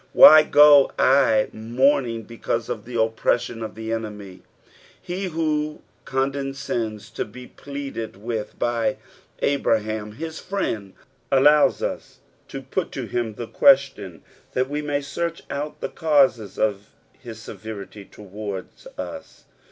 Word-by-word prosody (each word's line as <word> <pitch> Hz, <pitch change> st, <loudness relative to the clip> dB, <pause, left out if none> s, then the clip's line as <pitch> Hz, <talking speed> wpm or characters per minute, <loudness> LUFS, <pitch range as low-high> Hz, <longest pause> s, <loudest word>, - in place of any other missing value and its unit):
"Why 155 Hz, 0 st, +10 dB
go 145 Hz, -2 st, +6 dB
I 130 Hz, -5 st, +4 dB
mourning 120 Hz, 0 st, +1 dB
heeaiae 115 Hz, 0 st, -3 dB
of -, -, -4 dB
the 120 Hz, 0 st, -8 dB
opjireimoa 115 Hz, 0 st, 0 dB
of -, -, -9 dB
the 110 Hz, 0 st, -6 dB
eneaiy 105 Hz, -4 st, -6 dB, 0.7 s
f" -, -, -22 dB
lie 190 Hz, +2 st, -2 dB
who 155 Hz, -2 st, -2 dB, 0.2 s
condescends 135 Hz, -5 st, -3 dB
to -, -, -3 dB
bo 125 Hz, +4 st, -11 dB
pleaded 140 Hz, -5 st, -6 dB
with 110 Hz, +1 st, -5 dB
by 120 Hz, +2 st, 0 dB, 0.5 s
Abraham, 110 Hz, -6 st, 0 dB
his 160 Hz, +6 st, -6 dB
friend, 110 Hz, -, -3 dB, 0.4 s
allows 145 Hz, +2 st, +5 dB
us -, -, -5 dB, 0.3 s
to -, -, -7 dB
put -, -, -3 dB
to -, -, -4 dB
him 115 Hz, -3 st, -3 dB
the 120 Hz, -, -5 dB
question 110 Hz, -, +3 dB, 0.3 s
lliat 130 Hz, +1 st, +1 dB
we 145 Hz, +1 st, -2 dB
may 145 Hz, -1 st, -1 dB
search 165 Hz, +4 st, -4 dB
out 145 Hz, +2 st, -5 dB
the -, -, -3 dB
causes 135 Hz, -, +2 dB
of 105 Hz, -1 st, -1 dB, 0.3 s
his 115 Hz, -3 st, -9 dB
eevcrity 105 Hz, -2 st, -9 dB
towards 100 Hz, -, -8 dB
us. -, -, -8 dB
120 Hz, 130 wpm, -23 LUFS, 110-140 Hz, 0.7 s, Why